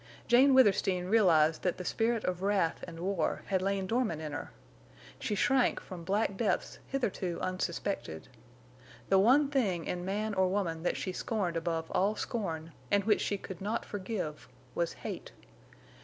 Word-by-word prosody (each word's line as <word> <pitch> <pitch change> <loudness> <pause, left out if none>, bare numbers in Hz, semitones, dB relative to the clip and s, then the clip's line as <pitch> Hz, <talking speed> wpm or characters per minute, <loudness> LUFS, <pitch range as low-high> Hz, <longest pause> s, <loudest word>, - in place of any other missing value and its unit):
Jane 260 +3 +6
Withersteen 195 -7 +4
realized 165 -7 +4
that 180 - 0
the 180 - -6
spirit 225 +2 0
of 180 0 -2
wrath 195 -4 +1
and 165 -1 -9
war 185 -3 -1
had 190 -2 0
lain 195 0 0
dormant 225 -6 0
in 155 -1 -5
her. 145 - -5 0.7
She 210 - -2
shrank 260 +5 +3
from 180 -3 -9
black 200 +3 0
depths 220 -2 -1
hitherto 200 -9 -2
unsuspected. 185 - -3 0.8
The 195 - +5
one 270 +8 +5
thing 195 - +1
in 175 0 -3
man 205 +3 -2
or 190 -1 +3
woman 180 -4 -1
that 175 - 0
she 185 - -3
scorned 185 -2 -2
above 165 -1 -2
all 200 +3 +2
scorn, 165 -10 -3 0.2
and 200 0 +3
which 210 0 +3
she 205 - 0
could 190 -2 -9
not 215 +4 -2
forgive, 185 -6 -4 0.3
was - - -1
hate. - - -6
190 Hz, 160 wpm, -31 LUFS, 175-215 Hz, 0.8 s, Jane